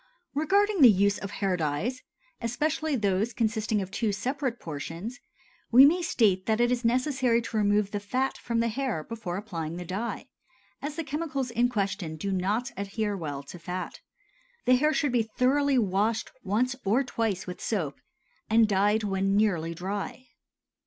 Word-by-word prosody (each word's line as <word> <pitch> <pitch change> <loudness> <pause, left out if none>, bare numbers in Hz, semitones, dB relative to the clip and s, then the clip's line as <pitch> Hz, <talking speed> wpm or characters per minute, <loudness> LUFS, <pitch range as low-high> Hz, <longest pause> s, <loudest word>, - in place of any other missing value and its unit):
Regarding 390 +6 +2
the 255 - +10
use 200 0 +3
of 200 - -5
hair 195 -2 -1
dyes, 175 - -2 0.4
especially 300 +6 0
those 205 0 0
consisting 220 -2 0
of 190 - -9
two 220 0 0
separate 250 +4 -2
portions, 165 - -6 0.5
we 255 +4 +9
may 345 +5 +4
state 210 - +2
that 220 0 +2
it 240 0 +3
is 250 0 0
necessary 250 0 +2
to 225 -1 -4
remove 205 -1 +2
the 205 - -2
fat 255 +6 -1
from 230 -1 -1
the 230 - +1
hair 230 - -2
before 200 -3 -5
applying 170 -6 -5
the 180 - -6
dye, 200 +7 -4 0.6
as 290 +1 -4
the 330 - -3
chemicals 285 -3 -3
in 240 +1 +2
question 195 -7 -2
do 195 +6 -3
not 205 +6 0
adhere 200 +2 -2
well 145 -6 -5
to 170 +5 -10
fat. 180 +2 -5 0.7
The 255 - +5
hair 300 +4 +3
should 290 -3 +1
be 240 -1 +3 0.2
thoroughly 275 +2 +3
washed 210 +1 +1
once 230 +6 +1
or 225 +8 +2
twice 225 -7 -2
with 180 -1 -7
soap, 165 -11 -2 0.5
and 225 0 +5
dyed 205 +2 +2
when 195 0 +1
nearly 170 -6 +1
dry. 200 +8 -4
220 Hz, 165 wpm, -28 LUFS, 195-250 Hz, 0.7 s, the